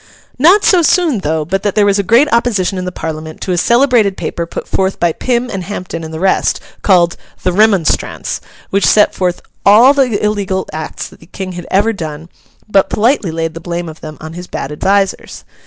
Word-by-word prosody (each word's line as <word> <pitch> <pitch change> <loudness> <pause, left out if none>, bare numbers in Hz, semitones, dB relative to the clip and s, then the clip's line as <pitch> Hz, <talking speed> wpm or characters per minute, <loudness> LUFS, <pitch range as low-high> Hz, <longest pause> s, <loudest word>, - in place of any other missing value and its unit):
Not 360 +9 +5
so 365 -3 +4
soon, 325 - +2
though, 155 -2 -1
but 195 +4 -1
that 205 -1 -1
there 210 -2 +4
was 200 0 +2
a - - +4
great 230 +9 +4
opposition 205 -6 +1
in 185 - -4
the 180 - -3
Parliament 155 -2 -6
to 185 - -3
a - - +1
celebrated 235 -2 +3
paper 170 -1 -4
put - - -7
forth 190 0 -1
by 170 -1 +2
Pym 245 +7 -1
and 190 -2 -4
Hampden 185 -3 -6
and 160 - -7
the 160 - -6
rest, 190 +1 +1 0.2
called 175 -3 +3 0.3
'The 180 - +1
Remonstrance,' 200 -4 +1 0.3
which 200 +1 +1
set 210 - +4
forth 180 -1 -2 0.2
all 230 +7 +7
the 260 -6 +1
illegal 200 -2 -1
acts 155 0 -5
that - - -18
the 165 - -18
King 185 +1 -6
had 175 -1 -8
ever 205 +4 +2
done, 160 -3 -7 0.4
but 200 -2 +2
politely 225 -3 +1
laid 165 0 -3
the 165 - -7
blame 170 0 -4
of 160 0 -10
them 155 -1 -8
on 160 +1 -8
his 180 +1 -8
bad 140 - -5
advisers. 195 +5 -1
190 Hz, 205 wpm, -14 LUFS, 170-215 Hz, 0.4 s, all